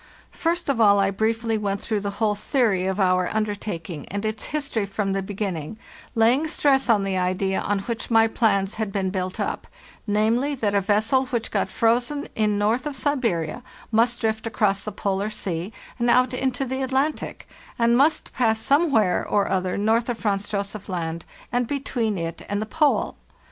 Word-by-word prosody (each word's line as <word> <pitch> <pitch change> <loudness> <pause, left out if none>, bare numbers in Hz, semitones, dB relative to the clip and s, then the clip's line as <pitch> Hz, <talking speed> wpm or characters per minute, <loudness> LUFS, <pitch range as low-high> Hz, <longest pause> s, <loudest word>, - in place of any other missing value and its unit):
First 340 +1 -1
of 270 -5 +1
all, 205 -2 +6
I 195 0 +2
briefly 225 +2 0
went 200 -1 -1
through 215 0 -2
the 200 0 -3
whole 215 -2 +2
theory 205 -4 +1
of 190 +1 -1
our 185 -1 +3
under 215 -1 0
taking, 170 -7 -6
and 200 +2 -4
its 215 0 -3
history 275 -9 -2
from 195 0 -1
the 195 - 0
beginning, 195 -2 -4 0.4
laying 240 +7 +3
stress 275 -4 +2
on 210 -3 +4
the 190 -1 -1
idea 185 +1 0
on 205 - 0
which 230 +2 -4
my 225 -1 +5
plans 205 -3 +1
had 215 -2 -2
been 190 -2 -1
built 185 -1 -3
up—namely, 235 - -1
that 215 -6 -1
a 200 - +3
vessel 220 +7 +2
which 235 -3 -2
got 195 -2 0
frozen 240 +8 +1
in 210 -2 +1
north 225 +7 +1
of 290 - -4
Siberia 235 - -1 0.3
must 235 +2 +2
drift 220 0 -1
across 205 -3 +1
the 215 +2 -6
Polar 200 +1 -1
Sea 185 -3 -4 0.3
and 240 0 +2
out 250 +1 +4
into 260 +1 -1
the 260 +1 -3
Atlantic, 270 +3 -1 0.3
and 235 0 +3
must 300 +5 +2
pass 225 -3 +2
somewhere 255 - +3
or 200 -1 +1
other 185 -1 0
north 225 +4 +1
of 240 - -1
Franz 205 -3 -1
Josef 200 0 -4
Land 170 -2 -3 0.3
and 245 -1 0
between 240 -6 -1
it 165 -1 -4
and 205 0 0
the 215 - -2
Pole. 300 +5 +1
215 Hz, 180 wpm, -24 LUFS, 195-245 Hz, 0.4 s, all